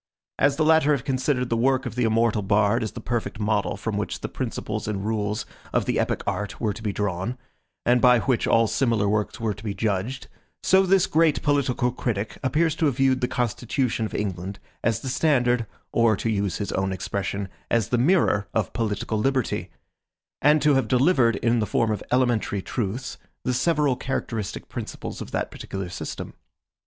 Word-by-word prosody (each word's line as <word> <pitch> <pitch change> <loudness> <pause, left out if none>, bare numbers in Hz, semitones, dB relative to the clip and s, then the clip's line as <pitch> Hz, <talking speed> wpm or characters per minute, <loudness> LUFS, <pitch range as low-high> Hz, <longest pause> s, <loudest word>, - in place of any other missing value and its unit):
As 140 0 +4
the 155 +1 +1
latter 160 -2 +5
have 135 -5 -1
considered 130 -1 0
the 115 - +1
work 130 +3 +2
of - - -4
the 125 0 +1
immortal 115 -1 +2
bard 105 +3 +2
as 110 - -3
the - - -6
perfect 120 -3 -3
model 105 -1 0
from 105 0 -3
which 105 -3 -3
the - - -3
principles - - -4
and 100 -2 -2
rules 105 0 -1 0.3
of - - +1
the - - 0
epic - - 0
art 105 -1 -3
were 105 -3 0
to 115 - -10
be 105 -2 -1
drawn, 100 +4 -2 0.5
and 120 0 +4
by 125 -1 +7
which 125 -4 +1
all 115 0 +4
similar 115 -3 +1
works 105 +1 -1
were 110 -2 0
to 100 - -13
be 105 -3 -3
judged, 110 +6 -2 0.4
so 190 0 +4
this 190 0 +4
great 160 -1 +2
political 130 -4 +1
critic 110 -4 -3
appears 155 +5 +2
to 160 - +2
have 140 - 0
viewed 130 -1 +3
the 125 - +2
Constitution 120 0 -1
of - - -9
England 95 -1 -3 0.3
as 115 -1 +1
the - - -6
standard, 125 -4 +2 0.2
or 115 -2 +4
to 115 +3 -1
use 100 -4 -1
his 100 - -3
own 95 0 0
expression, 100 +1 -3 0.2
as 115 -3 +1
the 125 - +2
mirror 130 - +3
of 110 -4 0
political 110 -1 -1
liberty; 130 +1 0 0.7
and 150 +2 +4
to 150 - +5
have 135 -4 +2
delivered, 125 - +3
in 115 +3 +1
the 105 - 0
form 115 -2 +1
of 105 - -2
elementary 120 -6 +1
truths, 115 +4 -3 0.2
the 125 - 0
several 145 0 +2
characteristic 115 -6 -4
principles - - -6
of - - -6
that - - -2
particular 95 -2 -6
system. 90 - -6
115 Hz, 190 wpm, -25 LUFS, 105-130 Hz, 0.7 s, by